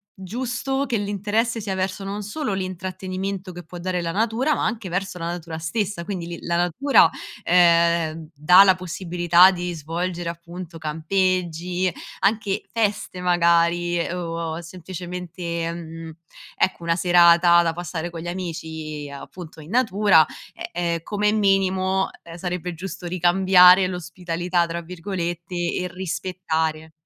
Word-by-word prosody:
giusto, 255 Hz, +7 st, -3 dB
che 240 Hz, -4 st, -1 dB
l'interesse 210 Hz, +3 st, -1 dB
sia 200 Hz, -3 st, -3 dB
verso 190 Hz, +1 st, -2 dB
non 200 Hz, +2 st, -4 dB
solo 215 Hz, +3 st, -3 dB
l'intrattenimento 185 Hz, +1 st, -4 dB
che 175 Hz, 0 st, -9 dB
può 175 Hz, +2 st, -9 dB
dare 180 Hz, +1 st, -2 dB
la 170 Hz, -1 st, -2 dB
natura, 225 Hz, -, +1 dB
ma -, -, -1 dB
anche 220 Hz, -2 st, -2 dB
verso 180 Hz, +1 st, -3 dB
la 165 Hz, -, -5 dB
natura 170 Hz, -1 st, -5 dB
stessa. 170 Hz, +2 st, -2 dB
Quindi, 180 Hz, -4 st, -4 dB
li 170 Hz, 0 st, -6 dB
la 170 Hz, -, -1 dB
natura, 180 Hz, -, +4 dB, 0.3 s
ehm, 170 Hz, -2 st, +3 dB
dà 180 Hz, +6 st, +7 dB
la 190 Hz, -2 st, +5 dB
possibilità 175 Hz, 0 st, +4 dB
di 175 Hz, -1 st, -4 dB
svolgere, 170 Hz, +2 st, -3 dB
appunto, 170 Hz, 0 st, -8 dB
campeggi, 175 Hz, +2 st, -1 dB, 0.3 s
anche 205 Hz, -1 st, +1 dB
feste 205 Hz, -4 st, -1 dB
magari 175 Hz, 0 st, +2 dB
o 165 Hz, -2 st, -4 dB
semplicemente, 175 Hz, -1 st, -5 dB
mhmm, 165 Hz, -1 st, -8 dB, 0.5 s
ecco 185 Hz, -2 st, 0 dB
una 165 Hz, 0 st, +1 dB
serata 175 Hz, 0 st, +6 dB
da 165 Hz, -1 st, 0 dB
passare 175 Hz, 0 st, -5 dB
con 170 Hz, -, -7 dB
gli 170 Hz, -, -7 dB
amici 160 Hz, -4 st, -5 dB
appunto 160 Hz, +3 st, -10 dB
in 155 Hz, +4 st, -12 dB
natura, 210 Hz, -8 st, +4 dB, 0.5 s
ehm, 170 Hz, -1 st, -1 dB
come 210 Hz, +3 st, 0 dB
minimo, 190 Hz, -2 st, +2 dB
ehm, 170 Hz, 0 st, -11 dB
sarebbe 180 Hz, 0 st, -4 dB
giusto 180 Hz, +1 st, -7 dB
ricambiare 180 Hz, +1 st, +6 dB
"l'ospitalità" 180 Hz, -1 st, -2 dB
tra 170 Hz, +1 st, -4 dB
virgolette 175 Hz, 0 st, -5 dB, 0.2 s
e 180 Hz, -, -2 dB
rispettare. 160 Hz, -3 st, -3 dB
180 Hz, 135 wpm, -23 LUFS, 170-190 Hz, 0.5 s, dà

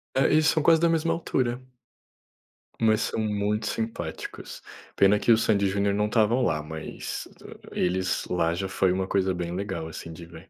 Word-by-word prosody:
É, 135 Hz, -, +3 dB
eles 155 Hz, 0 st, +4 dB
são 155 Hz, -, +3 dB
quase 165 Hz, 0 st, +5 dB
da 170 Hz, -, +4 dB
mesma 165 Hz, 0 st, +1 dB
altura. 125 Hz, -7 st, -1 dB, 1.2 s
Mas 110 Hz, 0 st, +3 dB
são -, -, -2 dB
muito 105 Hz, 0 st, -1 dB
simpáticos. 110 Hz, -8 st, -5 dB, 0.3 s
Pena 100 Hz, +1 st, +4 dB
que 120 Hz, -, +3 dB
o 110 Hz, -, +7 dB
Sandi 100 Hz, -3 st, +2 dB
e -, -, +2 dB
Junior 100 Hz, +1 st, +1 dB
não 105 Hz, +1 st, +1 dB
estavam 115 Hz, +3 st, +2 dB
lá, 80 Hz, -9 st, 0 dB
mas 80 Hz, 0 st, -6 dB, 0.4 s
eles 90 Hz, +1 st, 0 dB
lá, 85 Hz, -2 st, +1 dB
já 95 Hz, +2 st, -3 dB
foi 95 Hz, -1 st, +1 dB
uma 95 Hz, +1 st, -1 dB
coisa 95 Hz, -1 st, +1 dB
bem 85 Hz, -1 st, -4 dB
legal, 95 Hz, -4 st, -4 dB
assim, 80 Hz, +1 st, -8 dB
de 85 Hz, +1 st, -10 dB
ver. 85 Hz, +2 st, -14 dB
100 Hz, 185 wpm, -26 LUFS, 90-115 Hz, 1.2 s, o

